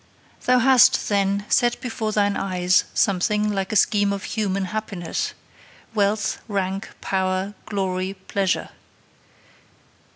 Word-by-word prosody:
'Thou 250 0 +4
hast, 255 0 +5
then, 200 0 +1
set 240 -2 +2
before 225 -3 -3
thine 205 -1 +1
eyes 180 -1 +1
something 210 +2 +1
like 195 +1 -2
a - - -2
scheme 205 0 +3
of 200 -1 -4
human 195 -3 -1
happiness 200 -6 -3 0.6
wealth, 210 0 0
rank, 195 -2 -2
power, 190 +1 -1
glory, 190 -2 -2
pleasure. 190 -1 -1
200 Hz, 110 wpm, -23 LUFS, 190-215 Hz, 0.6 s, hast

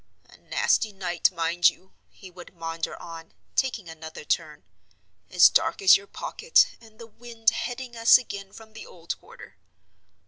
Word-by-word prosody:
"A - - -19
nasty 215 - 0
night, 180 -3 0
mind 170 0 +2
you," 190 - -17 0.2
he 185 - -15
would 180 0 -14
maunder 165 -1 -5
on, 165 -1 -11 0.2
taking 240 -8 -1
another 160 -1 -10
turn. 150 - -2 0.7
"As 180 - +7
dark - - +1
as 195 -1 +7
your 200 0 -4
pocket, 485 - +2 0.2
and 220 -1 -19
the 230 - -11
wind 230 0 -1
heading 240 +2 -6
us 230 +2 +7
again 200 -6 -8
from 220 0 -15
the 220 - -11
old 170 -1 -7
quarter." - - -15
195 Hz, 160 wpm, -25 LUFS, 170-230 Hz, 0.7 s, As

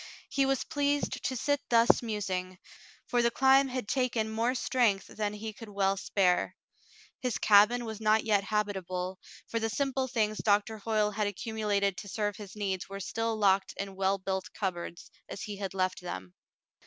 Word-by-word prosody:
He 275 -1 +2
was 270 -1 +1
pleased 285 0 -1
to 260 - 0
sit 285 +3 +1
thus 230 0 +5
musing, 190 -5 -3 0.5
for 245 - +1
the 235 - +4
climb 265 +3 +5
had 255 -4 -4
taken 235 -3 0
more 230 +3 0
strength 230 -7 +2
than 210 -1 -3
he 215 +1 -6
could 225 0 -10
well 195 -1 +1
spare. 190 -2 +1 0.6
His 250 -3 -1
cabin 215 +4 +5
was 220 -1 -6
not 215 0 +3
yet 205 -3 +2
habitable, 190 -3 -2 0.3
for 230 - -1
the 225 0 -1
simple 270 +1 0
things 215 -4 0
Doctor 210 +1 +1
Hoyle 210 0 +1
had 210 0 0
accumulated 205 -1 -1
to 200 - -7
serve 205 0 -1
his 205 -2 -9
needs 195 -3 -3
were 195 0 -6
still 225 +3 -2
locked 195 -2 +2
in 195 -1 -5
well 195 +1 +1
built 190 0 -3
cupboards, 175 -4 -4 0.2
as - - -6
he 205 -2 -5
had 195 -1 -5
left 185 -1 0
them. 95 - -6
210 Hz, 175 wpm, -30 LUFS, 195-230 Hz, 0.6 s, thus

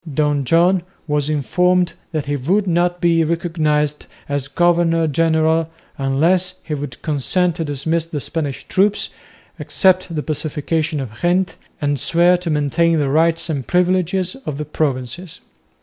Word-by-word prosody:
Don 145 -1 0
John 175 +6 +3 0.3
was 150 -1 0
informed 180 +5 +1 0.2
that 155 -3 -2
he 145 0 -1
would 180 +10 +1
not 175 0 +1
be 165 -1 +3
recognised 155 -3 -1 0.2
as 145 -1 -2
governor 170 +1 +2
general 160 +1 +2 0.3
unless 165 +7 +1
he 155 - -5
would 140 -4 -5
consent 165 +4 0
to 165 - -1
dismiss 160 +3 -1
the 155 -3 -4
Spanish 145 -2 -4
troops, 205 +2 +1 0.5
accept 185 -2 +2
the 150 - -2
Pacification 155 0 -1
of 120 -4 -7
Ghent, 180 +2 +1 0.2
and 145 -3 0
swear 175 +6 +4
to 175 -1 -5
maintain 155 +3 +2
the 145 -3 0
rights 165 +4 +2
and 140 -6 -3
privileges 180 0 +1
of 145 - -4
the 150 - -4
Provinces. 150 +2 -3
160 Hz, 145 wpm, -19 LUFS, 145-175 Hz, 0.5 s, swear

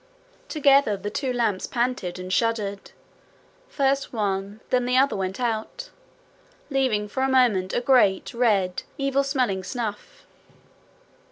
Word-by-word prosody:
Together 280 -8 +3
the 205 +2 -5
two 265 +3 -2
lamps 225 -6 -1
panted 240 -8 -2
and 185 0 -5
shuddered. 210 -2 -1 0.8
First 275 -1 0
one, 200 -2 -2
then 250 -1 +2
the 250 +1 +1
other 270 -3 +3
went 190 +1 -3
out, 240 - -3 0.8
leaving 255 -7 +1
for 235 +6 -4
a 265 - +2
moment 235 -8 +3
a - - 0
great, 235 -7 +3
red, 205 -7 +1 0.2
evil 275 0 +1
smelling 255 -9 -1
snuff. 230 - -6
235 Hz, 125 wpm, -24 LUFS, 200-265 Hz, 0.8 s, Together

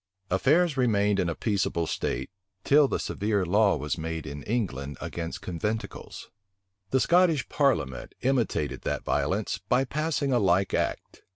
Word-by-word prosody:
Affairs 145 - +3
remained 105 -5 +2
in 90 -3 +1
a 85 - -2
peaceable 100 -6 0
state, 65 -3 -3 0.3
till 145 0 +5
the - - -1
severe 100 -2 -1
law 100 +3 +3
was 75 +4 -3
made 80 0 -4
in 70 -1 -6
England 75 - -3
against 85 -1 -5
conventicles.[] 105 +6 -5 0.6
The 130 - +2
Scottish 170 -2 +3
parliament 115 - 0
imitated 110 - 0
that - - -2
violence, 100 +3 0
by 125 +2 +4
passing 145 0 -1
a 120 - +4
like 95 -1 +2
act. - - -2
105 Hz, 145 wpm, -27 LUFS, 85-130 Hz, 0.6 s, till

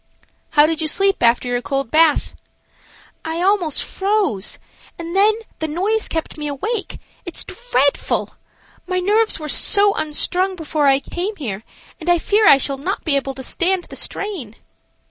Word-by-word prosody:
"How 295 - +8
did 320 0 -1
you 315 - -1
sleep 390 +5 +1
after 235 +1 +3
your 245 0 -1
cold 275 -2 -3
bath?" 315 -1 +3 0.9
"I 320 +1 -3
almost 375 -6 +1
froze, 390 - 0 0.4
and 335 +1 -6
then 415 +2 +4 0.2
the 315 - -1
noise 395 +8 0
kept 320 -1 -4
me 300 - -3
awake. 400 - -3 0.3
It's 345 - -3
dreadful! 285 - 0 0.5
My 365 0 -1
nerves 425 +3 +1
were 305 - -6
so 405 +6 +4
unstrung 360 +5 -1
before 310 -3 -1
I 270 0 +4
came 375 +8 -4
here, 220 - -5 0.4
and 345 +1 -4
I 350 - +5
fear 415 +5 +2
I 280 - +8
shall 275 0 -1
not 370 +8 -3
be 305 -4 +1
able 270 -1 -2
to 265 - -7
stand 365 +6 0
the - - -7
strain." 345 - -4
330 Hz, 165 wpm, -19 LUFS, 280-390 Hz, 0.9 s, How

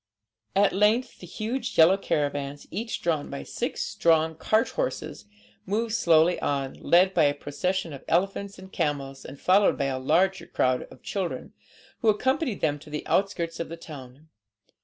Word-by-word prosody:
At 200 +1 +4
length 215 +6 +2
the 180 - -10
huge 230 +7 -4
yellow 165 +4 +7
caravans, 145 -6 -2
each 225 +1 -4
drawn 160 -4 0
by 140 - -6
six - - -3
strong 160 -1 +2
cart 215 +8 +1
horses, 105 - -4 0.4
moved 220 +3 -1
slowly 170 -4 +4
on, 135 -2 -1
led 185 +2 +4
by - - +4
a 145 0 +2
procession 170 +4 -2
of 135 - -9
elephants 195 +3 0
and 190 0 -13
camels, 140 -4 -2
and 135 +1 -10
followed 195 +2 +4
by 140 - 0
a 130 - -3
large 175 +8 +2
crowd 130 0 +1
of 130 - -16
children, 190 -4 -4 0.5
who 225 - +3
accompanied 260 - 0
them 145 -2 +1
to 150 - -14
the 150 0 -5
outskirts 185 -4 0
of 170 - -4
the 165 - -7
town. 145 -2 -11
170 Hz, 165 wpm, -26 LUFS, 145-195 Hz, 0.5 s, yellow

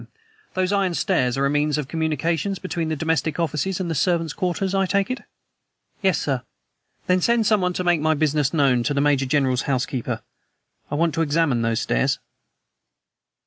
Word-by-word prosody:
"Those 185 0 +1
iron 190 -3 +1
stairs 130 -11 +1
are 135 - +2
a - - +2
means 150 0 +1
of 150 -3 -3
communication 165 +4 -1
between 170 -3 -3
the 160 - -1
domestic 160 +1 -1
offices 170 +4 -1
and 185 - -2
the 165 - -1
servants' 165 0 +1
quarters, 185 +1 -1
I 195 -1 +2
take 200 +4 +1
it?" 255 - -4 0.8
"Yes, 190 -4 +3
sir." 135 -4 -1 0.6
"Then 180 0 +2
send 235 +2 +2
someone 195 -4 +2
to 185 - -2
make 175 -3 +2
my 155 0 +2
business 150 -1 +1
known 140 -6 +3
to 145 - 0
the - - +2
Major 140 -2 +2
General's 130 -2 +2
housekeeper; 130 -2 -2 0.7
I 145 - -2
want 165 +1 +1
to 165 - 0
examine 145 -5 +1
those 115 0 0
stairs." - - +1
160 Hz, 180 wpm, -23 LUFS, 140-180 Hz, 0.8 s, Yes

